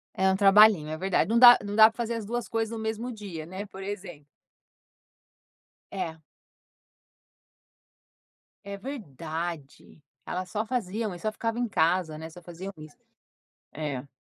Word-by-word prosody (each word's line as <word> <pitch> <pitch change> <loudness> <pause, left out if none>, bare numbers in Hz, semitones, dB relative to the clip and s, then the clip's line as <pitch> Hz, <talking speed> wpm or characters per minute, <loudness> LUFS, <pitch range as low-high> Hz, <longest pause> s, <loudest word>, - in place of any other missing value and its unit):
É 190 0 +2
um 190 - +1
trabalhinho, 195 -5 +6
é 155 - -3
verdade, 190 +2 0
não 230 - +3
dá 245 0 +10
não 205 0 -5
dá 220 0 +8
pra - - -25
fazer 235 -1 -2
as 220 -3 -5
2 240 0 -3
coisas 225 -1 -2
no 230 - -5
mesmo 220 +3 -3
dia, 190 -8 -8
né, 190 +3 -6
por 195 -1 -11
exemplo. 185 -7 -7 1.7
É. 165 -5 -5 2.4
É 200 0 -6
verdade, 165 - -7 0.2
elas 185 0 -4
só 215 +2 -2
faziam 220 -3 -3
e 175 - -8
só 215 +4 -3
ficavam 230 +2 -3
em 240 - 0
casa, 165 -2 +1
né, 160 +1 -8
só 175 +2 -13
faziam 175 +3 -8
isso. 155 -1 -12 0.8
É. 145 -3 -5
195 Hz, 150 wpm, -27 LUFS, 165-220 Hz, 2.4 s, dá